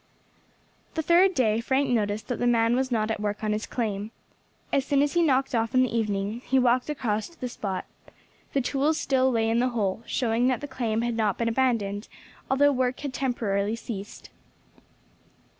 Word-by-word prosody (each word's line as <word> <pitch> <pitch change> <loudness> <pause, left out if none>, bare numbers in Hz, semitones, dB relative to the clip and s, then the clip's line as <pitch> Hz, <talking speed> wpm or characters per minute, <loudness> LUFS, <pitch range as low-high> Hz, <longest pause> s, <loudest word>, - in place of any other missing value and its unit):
The 320 - -1
third 355 +4 +4
day 225 -3 +2
Frank 265 +3 +1
noticed 215 -2 0
that 245 - -2
the 245 - +1
man 230 0 +3
was 260 0 0
not 220 -2 +1
at 220 - -2
work 210 +1 -3
on 215 - 0
his 215 +1 -3
claim. 210 -3 -3 0.6
As 275 - +3
soon 280 +1 +2
as 290 - -1
he 345 - +3
knocked 270 -4 +2
off 230 +1 0
in 255 - +6
the 245 -2 -1
evening 210 0 -1
he 265 - +1
walked 250 +1 +2
across 220 -7 -2
to 335 - -22
the 250 - -3
spot. 200 -5 -4 0.7
The 275 - +2
tools 285 +5 0
still 260 -1 +2
lay 225 -3 +1
in 225 +1 +2
the 250 +1 +2
hole, 215 -4 -1
showing 240 -1 +1
that 255 -2 +1
the 290 - -6
claim 230 -4 -1
had 240 0 -1
not 215 -3 0
been 230 -1 0
abandoned, 225 -5 0 0.4
although 285 +2 +4
work 255 -1 -1
had 285 -3 -4
temporarily 220 -5 -1
ceased. 210 -3 -8
240 Hz, 190 wpm, -26 LUFS, 215-265 Hz, 0.7 s, in